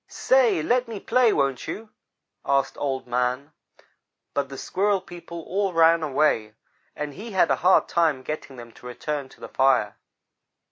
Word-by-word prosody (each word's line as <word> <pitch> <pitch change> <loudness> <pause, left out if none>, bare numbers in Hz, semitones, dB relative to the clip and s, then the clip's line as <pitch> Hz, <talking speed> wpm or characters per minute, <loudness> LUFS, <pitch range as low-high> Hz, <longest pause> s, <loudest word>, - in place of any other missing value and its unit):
"'Say, - - +2
let 250 0 +1
me 225 -3 -6
play, 240 +1 +3
won't 135 -7 0
you?' 220 0 -6 0.5
asked 135 -1 +1
Old 135 -2 -2
man. 125 +4 -1 0.8
But 140 -1 -1
the 135 - -8
Squirrel 200 +5 0
people 170 -2 -10
all 195 +1 -1
ran 165 0 +5
away, 130 -7 +1 0.4
and 150 -1 -5
he 215 +5 -9
had 185 -3 +3
a - - +2
hard 185 +2 +4
time 160 -6 +1
getting 145 -2 -6
them 120 -1 -11
to 125 - -13
return 135 +3 -4
to - - -19
the - - -8
fire. 130 -6 +2
155 Hz, 160 wpm, -24 LUFS, 135-195 Hz, 0.8 s, ran